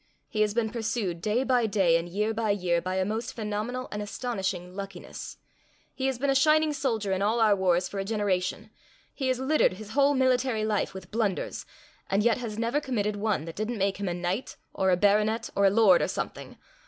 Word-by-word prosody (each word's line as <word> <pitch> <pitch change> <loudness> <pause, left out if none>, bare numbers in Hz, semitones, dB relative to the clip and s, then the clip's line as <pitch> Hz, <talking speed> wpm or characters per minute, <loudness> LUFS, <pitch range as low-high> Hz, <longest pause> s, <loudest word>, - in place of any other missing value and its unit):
He 215 - -1
has 210 0 +1
been 225 -2 0
pursued, 220 -7 -2
day 215 +7 +1
by 250 -3 +2
day 190 -5 +3
and 165 +1 -1
year 210 +5 -1
by 220 0 -1
year, 180 -4 +1
by 185 +2 -3
a 190 0 +1
most 220 +3 -3
phenomenal 220 +3 -3
and 210 - -3
astonishing 195 -5 -3
luckiness. 195 -2 -7 0.6
He 265 - -2
has 265 -2 -1
been 275 +2 +1
a - - +3
shining 305 +3 +4
soldier 225 -8 -1
in 190 0 0
all 215 +4 +2
our 215 -2 +5
wars 180 -2 +2
for 200 - -5
a - - -1
generation; 195 -3 -1 0.4
he 265 - -2
has 255 -1 +1
littered 275 -4 +3
his 210 +2 -10
whole 280 +3 +3
military 255 -4 +2
life 210 -2 -1
with 190 -1 -9
blunders, 215 -4 -2 0.4
and 200 +2 +2
yet 235 0 +3
has 225 -3 -5
never 235 +6 0
committed 210 -7 -1
one 205 -6 -1
that 165 - -8
didn't 220 +3 -3
make 195 0 0
him 200 -1 -3
a - - -1
knight 180 +7 -3 0.2
or 190 0 +1
a 180 - +4
baronet 210 +3 +2
or 200 - +3
a - - +7
lord 200 -3 +5
or - - +1
something. - - -5
210 Hz, 215 wpm, -27 LUFS, 195-235 Hz, 0.6 s, a